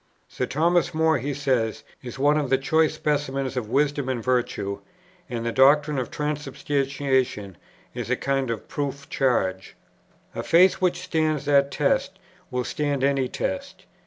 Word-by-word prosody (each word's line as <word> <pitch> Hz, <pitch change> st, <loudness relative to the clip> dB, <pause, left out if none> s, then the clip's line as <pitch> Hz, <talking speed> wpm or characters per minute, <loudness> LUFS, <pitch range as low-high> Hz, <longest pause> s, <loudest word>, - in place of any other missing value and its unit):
"Sir 125 Hz, -, -3 dB
Thomas 170 Hz, +3 st, +1 dB
More," 160 Hz, -2 st, +3 dB
he 140 Hz, +4 st, -3 dB
says, 130 Hz, -5 st, -1 dB, 0.2 s
"is 125 Hz, 0 st, -8 dB
one 145 Hz, +2 st, +3 dB
of 145 Hz, -3 st, 0 dB
the 135 Hz, -, +4 dB
choice 160 Hz, +3 st, +2 dB
specimens 135 Hz, -3 st, -1 dB
of 120 Hz, -4 st, -3 dB
wisdom 140 Hz, +1 st, +1 dB
and 120 Hz, -3 st, -2 dB
virtue; 120 Hz, -6 st, -1 dB, 0.5 s
and 115 Hz, -1 st, -4 dB
the 115 Hz, -, 0 dB
doctrine 145 Hz, +3 st, +4 dB
of 125 Hz, -, -3 dB
transubstantiation 135 Hz, -, -1 dB, 0.4 s
is -, -, -5 dB
a -, -, +2 dB
kind 135 Hz, -2 st, -1 dB
of 115 Hz, -2 st, -4 dB
proof 140 Hz, -1 st, -4 dB
charge. 95 Hz, -8 st, 0 dB, 0.6 s
A -, -, -3 dB
faith 180 Hz, +3 st, +4 dB
which 180 Hz, -1 st, +1 dB
stands 155 Hz, -4 st, 0 dB
that 140 Hz, -1 st, +4 dB
test, 150 Hz, +6 st, 0 dB, 0.3 s
will 125 Hz, -1 st, -2 dB
stand 145 Hz, 0 st, -2 dB
any 135 Hz, -2 st, +2 dB
test." 95 Hz, -, -4 dB
140 Hz, 155 wpm, -24 LUFS, 130-150 Hz, 0.6 s, the